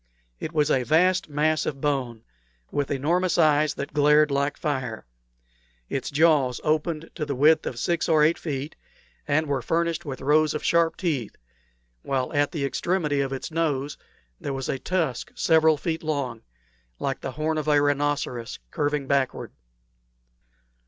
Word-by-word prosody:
It - - -5
was 150 -2 +1
a 130 - +3
vast 175 +7 +2
mass 155 +2 +1
of 140 - -3
bone, 130 -6 -2 0.5
with 145 -1 -1
enormous 170 +6 +1
eyes 155 -2 +3
that 140 - -6
glared 150 0 +4
like 140 +1 0
fire; 130 - -3 0.8
its 135 - -3
jaws 145 -5 +3
opened 155 +1 -1
to 160 - -4
the 145 -2 -3
width 155 +5 +4
of 120 - -4
six 170 +7 -1
or 155 -2 +5
eight 160 +2 +3
feet, 145 -1 -4 0.5
and 155 +2 +2
were 140 -3 -1
furnished 170 +4 -1
with 135 -4 -6
rows 155 +3 +3
of 150 - -4
sharp 170 -1 +2
teeth, 145 - -2 0.7
while 130 - -2
at 145 -1 +2
the 145 -4 -2
extremity 150 -1 0
of 135 -1 -2
its 135 +4 -5
nose 150 -3 -1 0.4
there 140 - -4
was 135 -1 -4
a 135 - -1
tusk 160 -7 -2
several 160 -1 +4
feet 160 +2 -3
long, 140 -7 -3 0.6
like 135 -1 -3
the 130 - -5
horn 155 +1 -1
of 155 - -5
a 150 -1 +4
rhinoceros, 145 -4 -1
curving 145 -3 -1
backward. 135 -1 -1
150 Hz, 160 wpm, -25 LUFS, 135-160 Hz, 0.8 s, or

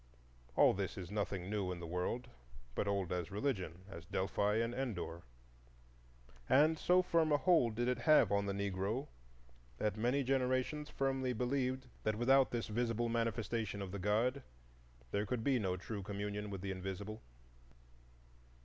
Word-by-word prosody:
All - - +6
this 95 -1 -3
is 95 -1 -6
nothing 100 -3 -2
new 100 -2 -1
in 90 - -5
the 85 - -6
world, 90 +8 -2 0.5
but 100 - -1
old 100 -3 0
as 90 -2 -2
religion, 95 - -2
as 85 -4 -9
Delphi 100 +2 0
and 115 +1 +1
Endor. 105 -10 -3 1.3
And 155 +3 +5
so 180 +1 +4
firm 165 -3 +2
a 145 - +5
hold 145 -10 +3
did 120 +1 0
it 125 -1 +1
have 150 +1 +5
on 100 0 +2
the - - 0
Negro, 100 +7 -2 0.7
that 105 +5 0
many 125 +5 +2
generations 130 +3 0
firmly 135 -2 0
believed 130 +2 -1 0.2
that 110 0 0
without 130 +4 +4
this 120 -1 -2
visible 115 +1 0
manifestation 115 -2 -1
of 95 -2 -5
the 100 - -4
God 115 +8 +1 0.7
there 105 +1 0
could 115 +1 -2
be 135 -1 +3
no 95 -3 -1
true 100 +2 -5
communion 105 +1 -4
with 100 -2 -5
the 95 0 -3
Invisible. 95 +3 -5
110 Hz, 160 wpm, -36 LUFS, 100-125 Hz, 1.3 s, All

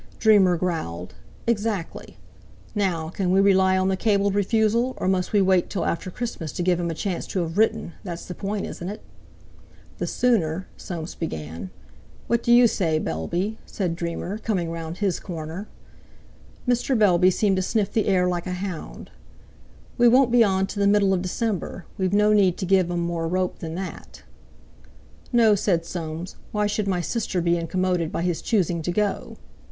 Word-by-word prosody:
Dreamer 200 -5 +5
growled. 125 - -3 0.3
"Exactly. 210 -6 -2 0.6
Now, 180 -7 -1
can 185 +1 -2
we 190 +2 +4
rely 190 -1 +4
on 185 0 +1
the 190 - +2
cabled 200 -1 +2
refusal, 220 +5 +1
or - - -2
must 185 -1 +1
we 205 -2 +4
wait 185 -2 +3
till 185 -5 -2
after 170 +2 -2
Christmas 180 - -5
to 175 - -2
give 180 -1 +2
him 170 -1 -1
a 165 - -3
chance 180 +2 -3
to 185 - -1
have 165 -1 -4
written—that's 180 -4 -1
the 180 - -6
point, 200 +2 -3
isn't 175 - -6
it?" 210 - -7 1.0
"The - - -1
sooner...." 190 -8 +1
Soames 170 -2 -6
began. 80 - -5 0.6
"What 235 0 +1
do 235 - +1
you 240 +1 +8
say, 165 -8 +1
Bellby?" 175 - -2
said 180 -5 -2
Dreamer, 170 +4 -4
coming 185 -7 -1
round 165 0 -5
his 195 -4 0
corner. 165 +3 -6 1.0
Mr. 245 +1 +2
Bellby 185 -4 +5
seemed 195 +1 +1
to - - +1
sniff 205 +2 0
the 220 - +1
air 185 -2 +3
like 175 0 -2
a 180 - -2
hound. 180 -2 -6 0.9
"We 240 - +7
won't 250 +1 +5
be 240 -1 +6
on 190 -2 +2
till 200 +1 -4
the 200 - +4
middle 200 -1 +4
of 180 - 0
December. 190 -1 -3
We've 185 -1 +1
no 210 +1 +4
need 190 -4 +4
to - - -3
give 185 -1 +3
um 175 0 -1
more 170 -1 -2
rope 185 +1 -1
than 160 -1 -5
that." 190 +1 -7 1.1
"No," 230 -3 +5
said 180 -4 +1
Soames, 165 0 -6
"why 210 -1 0
should 205 0 -1
my 180 -2 0
sister 200 -1 -2
be 170 0 +2
incommoded 175 0 -1
by 170 - -2
his 175 -2 -1
choosing 175 -6 +1
to 175 - -2
go..." 205 +2 -1
185 Hz, 180 wpm, -24 LUFS, 170-205 Hz, 1.1 s, you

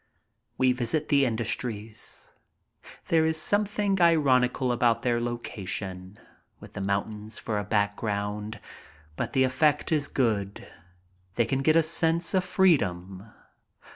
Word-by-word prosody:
We 130 0 +3
visit 130 +5 -2
the 140 -1 +4
industries. 115 -2 -4 0.8
There 165 -1 +4
is 160 0 +1
something 205 0 0
ironical 130 -6 +3
about 120 -1 +1
their 120 -1 +1
location 100 -5 -5 0.4
with - - -13
the - - -5
mountains 105 +2 -3
for 105 -2 -3
a - - -3
background, 105 +1 -2 0.6
but - - -4
the 130 -2 +3
effect 145 +5 +1
is 150 -2 +1
good, 105 -6 -1 0.7
they 115 - +2
can 135 +2 -1
get 155 +3 +3
a 165 - +5
sense 165 +2 +1
of 185 -1 +2
freedom. 100 - +1
120 Hz, 125 wpm, -27 LUFS, 105-155 Hz, 0.8 s, a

